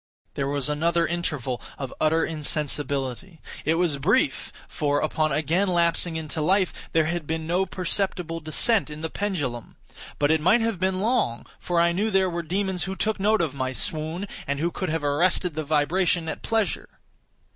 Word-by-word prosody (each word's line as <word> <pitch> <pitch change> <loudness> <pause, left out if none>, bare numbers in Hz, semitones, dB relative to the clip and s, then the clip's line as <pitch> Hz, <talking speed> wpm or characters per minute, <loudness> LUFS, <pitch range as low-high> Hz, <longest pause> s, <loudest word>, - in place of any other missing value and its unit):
There 140 - -2
was 140 -2 -1
another 165 +3 +1
interval 150 -8 -2 0.2
of 135 -3 -5
utter 160 +1 +3
insensibility; 145 +1 -3 0.3
it 160 +2 +3
was 165 -5 +1
brief; 200 - +1 0.2
for, 145 -2 0
upon 155 0 0
again 160 +7 +1
lapsing 170 -1 +3
into 160 0 -3
life 185 +3 +2 0.2
there 160 -1 +3
had 165 -1 -2
been 160 0 -2
no 180 +4 +1
perceptible 180 -2 -1
descent 165 +6 +2
in 150 +1 -8
the 160 - -4
pendulum. 145 - -3 0.4
But 145 +1 +2
it 160 -1 +2
might 190 +9 +4
have 225 -5 -1
been 185 0 0
long; 210 - 0
for 175 -1 0
I 170 0 +4
knew 200 +6 0
there 190 -3 +2
were 170 0 -2
demons 185 +2 -1
who 190 0 -4
took 215 +1 0
note 210 +1 +3
of 160 -5 -1
my 130 -1 -2
swoon, 160 +8 -2 0.2
and 140 0 -1
who 170 +3 0
could 185 - -3
have 160 -1 -1
arrested 170 +4 +2
the 155 +1 -3
vibration 160 +3 +1
at - - -4
pleasure. 220 -6 0
165 Hz, 180 wpm, -25 LUFS, 150-185 Hz, 0.4 s, might